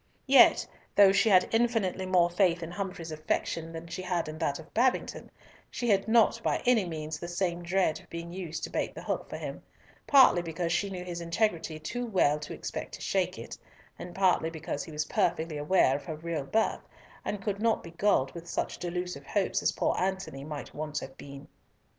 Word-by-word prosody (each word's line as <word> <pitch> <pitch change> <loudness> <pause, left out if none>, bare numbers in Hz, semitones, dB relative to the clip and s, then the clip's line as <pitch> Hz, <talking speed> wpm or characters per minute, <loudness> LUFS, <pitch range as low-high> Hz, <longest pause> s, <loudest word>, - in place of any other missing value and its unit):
Yet, 270 0 +6 0.3
though 200 -1 +8
she 200 +3 +3
had 185 -2 +5
infinitely 225 -5 +1
more 175 -2 +3
faith 175 -2 +2
in 165 - -6
Humfrey's 180 -4 -5
affection 160 +1 -2
than 165 0 -7
she 170 - -6
had 180 -3 -1
in 155 +1 -7
that 145 -4 0
of 160 - -13
Babington, 250 +2 0 0.4
she 240 - -2
had 195 0 +3
not 230 0 +4
by - - +1
any 240 -5 +4
means 155 -2 -5
the 170 - -6
same 175 0 -1
dread 175 -2 +1
of - - -19
being 170 0 -6
used 175 -4 -5
to - - -4
bait - - -2
the - - -8
hook - - -3
for - - -5
him, - - -6 0.5
partly 265 -10 +7
because 170 0 -3
she 200 +4 +1
knew 185 -2 -5
his 175 -1 -5
integrity 170 -2 -1
too 240 +11 -4
well 150 -8 +2
to 150 - -8
expect - - -5
to - - -12
shake - - 0
it, - - -7 0.4
and 175 0 -8
partly 185 -4 +3
because 160 -3 -4
he - - -10
was 150 0 -2
perfectly 165 -2 0
aware 150 -3 +3
of 145 - -12
her 160 - -4
real 160 -2 -4
birth, 220 +9 +1 0.4
and 205 -2 -4
could 200 -1 -2
not 230 -1 +2
be 170 - -9
gulled 170 -6 +2
with 170 0 -9
such - - -2
delusive 180 -5 -4
hopes 200 -3 0
as - - +2
poor - - 0
Antony 190 -7 -2
might 150 0 -7
once 155 0 -3
have 135 - -9
been. 140 0 -11
175 Hz, 205 wpm, -29 LUFS, 160-195 Hz, 0.5 s, though